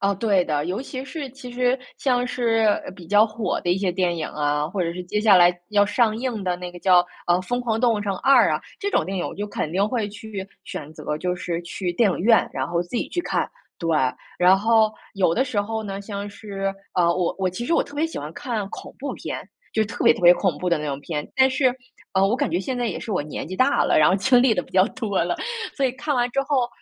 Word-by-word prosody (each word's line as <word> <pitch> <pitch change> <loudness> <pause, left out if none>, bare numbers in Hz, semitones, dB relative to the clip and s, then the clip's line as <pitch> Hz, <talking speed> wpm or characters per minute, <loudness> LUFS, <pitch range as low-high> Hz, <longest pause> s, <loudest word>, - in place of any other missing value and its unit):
哦， 200 0 +2
对 195 -3 +2
的。 150 -2 -1
尤 190 +8 -2
其 265 -1 -6
是 280 0 -6
其 255 -1 -10
实 250 +1 +1 0.2
像 250 -2 +1
是 230 -3 +1 0.3
比 175 -4 -12
较 210 +3 +5
火 215 0 -2
的 175 - 0
一 185 - +2
些 190 -2 0
电 180 -1 0
影 160 - -3
啊， 150 0 -1
或 185 +2 -2
者 170 -1 -1
是 180 - -6
接 210 +4 -1
下 215 -3 +6
来 175 0 +6 0.2
要 205 -1 +4
上 215 +1 +2
映 235 -4 -3
的 180 -1 0
那 180 0 -6
个 175 - -11
叫 180 0 +5 0.3
呃， 175 - +4
《疯 245 +6 -2
狂 225 -2 -1
动 240 -2 +4
物 210 - -2
城 200 -1 -2
2》 - - -9 0.3
啊， - - -2 0.2
这 405 0 -2
种 - - +2
电 195 +1 -4
影 180 - -1
我 - - -6
就 205 +1 -4
肯 160 -6 -3
定 195 +3 +2
会 225 -3 -1
去 210 -2 -7 0.2
选 155 +1 -7
择， 150 - -4
就 180 +2 -1
是 175 -1 -3
去 175 +1 -4
电 205 +3 +3
影 - - -2
院， 225 +5 +4
然 130 -1 -2
后 170 0 0
自 175 - -17
己 - - -2
去 350 - -2
看， - - -1 0.3
对。 165 - -3 0.5
然 180 +2 +6
后 220 +1 +3 0.2
有 185 -4 +2
的 260 - +2
时 240 -6 -1
候 220 +2 -3
呢， 200 -2 -5
像 200 0 -5
是 200 -1 -4 0.2
呃， 180 - +3
我 180 -1 0
我 190 -1 +1
其 185 +7 -5
实 330 - -1
我 - - +3
特 285 - -13
别 310 +3 +1
喜 325 - -6
欢 150 +1 -6
看 225 -7 -3
恐 - - -9
怖 280 - -4
片， - - -5 0.3
就 220 - +2
特 225 - -4
别 - - +8
特 - - -8
别 175 0 +8
恐 185 -6 0
怖 180 - -1
的 170 - +3
那 150 - -4
种 140 -1 -3
片。 150 0 -4
但 265 0 +6
是， 260 -1 +2 0.4
呃， 190 0 +3
我 225 - +1
感 285 +1 -1
觉 175 - 0
现 250 +6 -3
在 245 - -1
也 - - -3
是 - - -6
我 180 - 0
年 150 - -6
纪 185 - -5
大 265 +2 +3
了， - - +3
然 150 - +6
后 - - +3
经 245 +5 +4
历 250 -4 +4
得 180 - 0
比 - - -19
较 185 0 +5
多 220 -8 -1
了， 175 - -1 0.4
所 275 - +1
以 250 - -1
看 290 +3 -2
完 245 -1 +2
之 275 - +1
后， 270 -4 +1
205 Hz, 285 characters per minute, -23 LUFS, 180-245 Hz, 0.5 s, 别